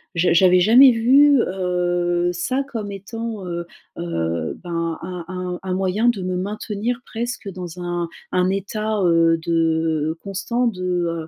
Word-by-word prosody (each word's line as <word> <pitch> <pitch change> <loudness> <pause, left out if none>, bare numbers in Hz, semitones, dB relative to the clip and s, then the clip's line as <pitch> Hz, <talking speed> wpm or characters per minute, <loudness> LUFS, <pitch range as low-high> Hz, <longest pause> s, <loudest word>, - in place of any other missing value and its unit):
j'a 170 0 +3
j'avais 180 +1 +5
jamais 240 +9 +7
vu, 270 +5 +5
heu, 175 -2 0
ça 255 +10 -1
comme 225 -7 -6
étant, 220 +1 -6
heu 170 -1 -4 0.3
heu, 85 - -2
ben, 170 -2 -3
un 180 0 -6
un 180 0 -5
un 185 -1 -3
moyen 195 +5 +1
de 205 -6 -1
me 185 0 -2
maintenir 210 +4 -3
presque 240 -1 -5
dans 180 -2 -8
un 175 -1 -3 0.2
un 180 0 +2
état, 215 +2 -2
heu, 165 -1 +4
de, 160 -1 0
constant 215 +5 -2
de, 180 -6 -2
180 Hz, 145 wpm, -21 LUFS, 170-215 Hz, 0.3 s, jamais